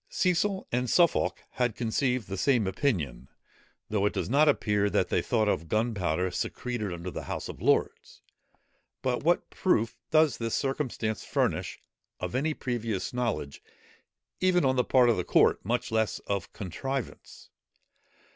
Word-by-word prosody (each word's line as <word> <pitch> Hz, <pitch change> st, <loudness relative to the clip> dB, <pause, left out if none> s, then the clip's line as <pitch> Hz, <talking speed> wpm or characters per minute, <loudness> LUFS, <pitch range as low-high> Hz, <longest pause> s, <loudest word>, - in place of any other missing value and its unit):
Cecil 190 Hz, +2 st, 0 dB
and 125 Hz, 0 st, 0 dB
Suffolk 170 Hz, +5 st, +2 dB
had 125 Hz, -3 st, 0 dB
conceived 125 Hz, +1 st, 0 dB
the 95 Hz, -, -4 dB
same 120 Hz, +2 st, +2 dB
opinion, 90 Hz, -, -1 dB, 0.6 s
though 105 Hz, -1 st, +1 dB
it -, -, -2 dB
does -, -, -3 dB
not 150 Hz, +3 st, +5 dB
appear 105 Hz, -7 st, +2 dB
that 90 Hz, -, +1 dB
they -, -, +2 dB
thought 110 Hz, -3 st, +1 dB
of 85 Hz, -5 st, 0 dB
gunpowder 95 Hz, -5 st, 0 dB
secreted 115 Hz, +2 st, -3 dB
under 85 Hz, +1 st, -5 dB
the -, -, -6 dB
House -, -, -4 dB
of -, -, -9 dB
Lords. -, -, 0 dB, 0.8 s
But 125 Hz, -2 st, 0 dB
what 170 Hz, +4 st, +1 dB
proof 115 Hz, -, +1 dB
does 155 Hz, -6 st, +3 dB
this 115 Hz, -1 st, -1 dB
circumstance 130 Hz, -6 st, -2 dB
furnish -, -, -1 dB, 0.4 s
of -, -, -4 dB
any 150 Hz, +4 st, 0 dB
previous 115 Hz, -6 st, -3 dB
knowledge 115 Hz, -13 st, -2 dB, 0.8 s
even, 180 Hz, -4 st, +3 dB
on 130 Hz, 0 st, +3 dB
the 125 Hz, -, +3 dB
part 125 Hz, -1 st, +4 dB
of 115 Hz, -, +3 dB
the 90 Hz, -, 0 dB
court, -, -, +3 dB
much 120 Hz, +3 st, -1 dB
less 110 Hz, -1 st, +1 dB
of 100 Hz, -3 st, -3 dB
contrivance? 130 Hz, +7 st, -6 dB
115 Hz, 150 wpm, -28 LUFS, 100-135 Hz, 0.8 s, not